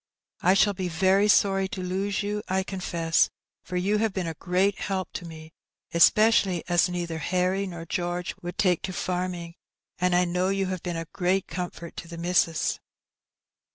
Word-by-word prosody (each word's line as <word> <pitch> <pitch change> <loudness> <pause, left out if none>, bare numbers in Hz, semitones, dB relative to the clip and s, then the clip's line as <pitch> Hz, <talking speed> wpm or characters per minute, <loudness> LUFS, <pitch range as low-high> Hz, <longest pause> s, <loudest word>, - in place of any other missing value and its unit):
I 185 +2 +4
shall 200 +1 +4
be 185 -1 -3
very 190 +4 +3
sorry 195 -2 +3
to 190 -1 -5
lose 195 +3 -1
you, 210 +1 -2
I 190 +1 0
confess, 170 -4 +1 0.3
for 180 - -5
you 200 +4 +1
have 220 -2 0
been 190 -2 -2
a 165 - -3
great 185 +5 0
help 190 -3 -3
to 180 - -5
me, 160 -1 -11 0.4
especially 190 0 +4
as 175 0 +3
neither 170 -2 -3
Harry 185 +5 0
nor 170 -2 -7
George 175 +1 -2
would 175 0 -6
take 180 -4 +2
to 185 - -4
farming, 180 -2 -3 0.5
and 180 0 +2
I 180 0 +4
know 180 +2 0
you 195 0 0
have 185 -2 -3
been 175 -2 -3
a 165 - -4
great 185 +1 +1
comfort 170 -1 -6
to 170 - -7
the 170 0 -8
missus." 170 -2 +1
180 Hz, 180 wpm, -26 LUFS, 175-195 Hz, 0.5 s, I